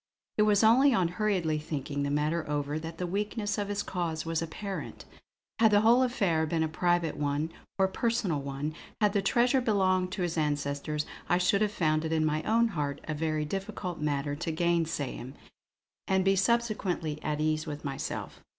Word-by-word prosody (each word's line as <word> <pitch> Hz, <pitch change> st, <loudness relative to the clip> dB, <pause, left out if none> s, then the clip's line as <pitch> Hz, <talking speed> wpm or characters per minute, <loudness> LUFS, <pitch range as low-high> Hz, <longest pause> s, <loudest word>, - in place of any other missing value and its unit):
It 210 Hz, 0 st, +5 dB
was 205 Hz, +1 st, +4 dB
only 250 Hz, +4 st, +6 dB
on 180 Hz, -5 st, +2 dB
hurriedly 180 Hz, -5 st, 0 dB
thinking 145 Hz, -2 st, -4 dB
the 140 Hz, -, 0 dB
matter 150 Hz, +3 st, 0 dB
over 145 Hz, +1 st, -1 dB
that 165 Hz, +1 st, -7 dB
the 180 Hz, -, -2 dB
weakness 210 Hz, +3 st, -2 dB
of 205 Hz, -, -1 dB
his 205 Hz, 0 st, -2 dB
cause 170 Hz, -4 st, -3 dB
was 165 Hz, 0 st, -1 dB
apparent. 190 Hz, +4 st, -6 dB, 0.5 s
Had 225 Hz, -1 st, +6 dB
the 205 Hz, -1 st, +5 dB
whole 235 Hz, +3 st, +5 dB
affair 195 Hz, -, +1 dB
been 160 Hz, 0 st, 0 dB
a -, -, +1 dB
private 170 Hz, 0 st, +1 dB, 0.6 s
or 190 Hz, -1 st, +4 dB
personal 195 Hz, -7 st, 0 dB
one; 140 Hz, +2 st, -4 dB, 0.3 s
had 210 Hz, -2 st, +3 dB
the 200 Hz, -, +2 dB
treasure 245 Hz, +6 st, +3 dB
belonged 185 Hz, -5 st, +2 dB
to 185 Hz, -, -2 dB
his 170 Hz, -2 st, -1 dB
ancestors, 145 Hz, 0 st, -1 dB, 0.2 s
I 175 Hz, -, +4 dB
should 180 Hz, +3 st, +2 dB
have 210 Hz, -1 st, +2 dB
found 155 Hz, -5 st, +1 dB
it 160 Hz, -, -2 dB
in 155 Hz, -1 st, +2 dB
my 155 Hz, 0 st, +1 dB
own 230 Hz, +5 st, +2 dB
heart 145 Hz, -7 st, -2 dB
a 155 Hz, -, -3 dB
very 155 Hz, 0 st, -1 dB
difficult 185 Hz, 0 st, -4 dB
matter 145 Hz, -1 st, -1 dB
to 165 Hz, +2 st, -3 dB
gainsay 165 Hz, -4 st, 0 dB
him, 130 Hz, +3 st, -8 dB, 0.7 s
and 190 Hz, -1 st, +2 dB
be 195 Hz, 0 st, +4 dB
subsequently 195 Hz, -8 st, 0 dB
at 150 Hz, -1 st, -2 dB
ease 155 Hz, +1 st, 0 dB
with 150 Hz, 0 st, -6 dB
myself. 135 Hz, -1 st, -5 dB
170 Hz, 185 wpm, -29 LUFS, 155-205 Hz, 0.7 s, only